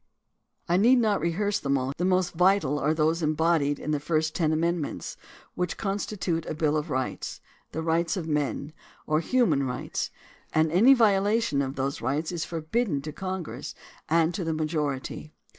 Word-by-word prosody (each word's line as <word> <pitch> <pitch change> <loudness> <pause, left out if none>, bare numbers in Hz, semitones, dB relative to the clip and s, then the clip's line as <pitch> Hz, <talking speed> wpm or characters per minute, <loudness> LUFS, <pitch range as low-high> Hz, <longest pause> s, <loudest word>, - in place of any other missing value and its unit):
I 175 0 +3
need 240 +6 +5
not 215 -6 +2
rehearse 200 +5 0
them 140 0 +1
all; 130 +1 -2
the 175 - -1
most 185 -1 +2
vital 180 -5 +3
are 150 +2 +1
those 160 +2 +1
embodied 155 -2 +2
in 150 - -4
the 150 - +1
first 155 +1 0
ten 160 -3 +1
amend 170 +2 +1
ments 145 - -5 0.4
which 180 -1 -2
constitute 195 -4 -2
a - - -3
bill 155 -1 +1
of 150 -1 -2
rights, 130 0 -3 0.3
the 160 - -3
rights 165 +2 +1
of 165 -3 -4
men, 150 0 -1 0.3
or 155 0 +2
human 170 - +2
rights, 125 -2 -3 0.4
and 155 0 +3
any 230 +11 +7
violation 210 - +3
of 135 0 -3
those 135 +1 -2
rights 150 +5 -1
is 165 -3 -3
forbidden 165 - -1
to 155 - -5
Congress 185 -1 -5 0.3
and 165 +1 +3
to 180 - -3
the 165 -1 -1
majority. 155 -1 -3
160 Hz, 175 wpm, -27 LUFS, 150-185 Hz, 0.4 s, any